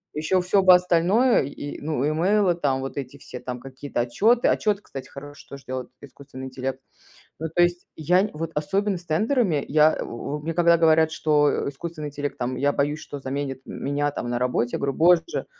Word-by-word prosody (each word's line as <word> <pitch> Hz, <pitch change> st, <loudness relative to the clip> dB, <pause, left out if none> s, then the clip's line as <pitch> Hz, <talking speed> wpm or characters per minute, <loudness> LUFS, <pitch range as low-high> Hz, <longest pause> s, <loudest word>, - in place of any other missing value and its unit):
Ещё 160 Hz, +5 st, +1 dB
всё 190 Hz, +2 st, +2 dB
бы 185 Hz, -1 st, +8 dB
остальное 180 Hz, +8 st, +3 dB
и 145 Hz, +1 st, -7 dB
ну, 150 Hz, -2 st, -1 dB
имейлы, 180 Hz, +4 st, +2 dB
там, 140 Hz, -6 st, -1 dB
вот 135 Hz, +1 st, -6 dB
эти 135 Hz, 0 st, -6 dB
все 130 Hz, -2 st, -9 dB
там 125 Hz, 0 st, -6 dB
какие-то 135 Hz, 0 st, -5 dB
отчеты. 215 Hz, -, +2 dB
Отчет, 210 Hz, -2 st, +1 dB
кстати, 135 Hz, -9 st, -9 dB
хороший, 145 Hz, +1 st, -11 dB
тоже 140 Hz, -1 st, -10 dB
делает 130 Hz, -1 st, -5 dB
искусственный 135 Hz, -1 st, -11 dB
интеллект. 130 Hz, 0 st, -4 dB, 0.6 s
Ну, 160 Hz, +1 st, -3 dB
то 175 Hz, +3 st, +2 dB
есть, 175 Hz, 0 st, 0 dB
я 180 Hz, +5 st, +2 dB
нь 210 Hz, -, -2 dB
вот 165 Hz, +1 st, -4 dB
особенно 195 Hz, +6 st, 0 dB
с 175 Hz, -, -18 dB
тендерами 190 Hz, -, +1 dB
я 155 Hz, +2 st, +4 dB
в -, -, -5 dB
во 140 Hz, +5 st, -5 dB
мне 160 Hz, +3 st, -3 dB
когда 170 Hz, 0 st, +4 dB
говорят, 160 Hz, -1 st, +4 dB
что, 150 Hz, -2 st, +2 dB
э, -, -, -2 dB
искусственный 150 Hz, +1 st, -6 dB
интеллект 145 Hz, 0 st, -5 dB
там, 125 Hz, +1 st, -2 dB
я 140 Hz, +2 st, +1 dB
боюсь, 145 Hz, +2 st, 0 dB
что 145 Hz, -2 st, -8 dB
заменит 135 Hz, 0 st, -4 dB
меня 145 Hz, +1 st, -2 dB
там 120 Hz, -, -5 dB
на 120 Hz, 0 st, -2 dB
работе, 125 Hz, -1 st, 0 dB
я -, -, -1 dB
говорю: 140 Hz, -1 st, -1 dB
"Боже, 175 Hz, -, +3 dB
150 Hz, 200 wpm, -24 LUFS, 135-175 Hz, 0.6 s, бы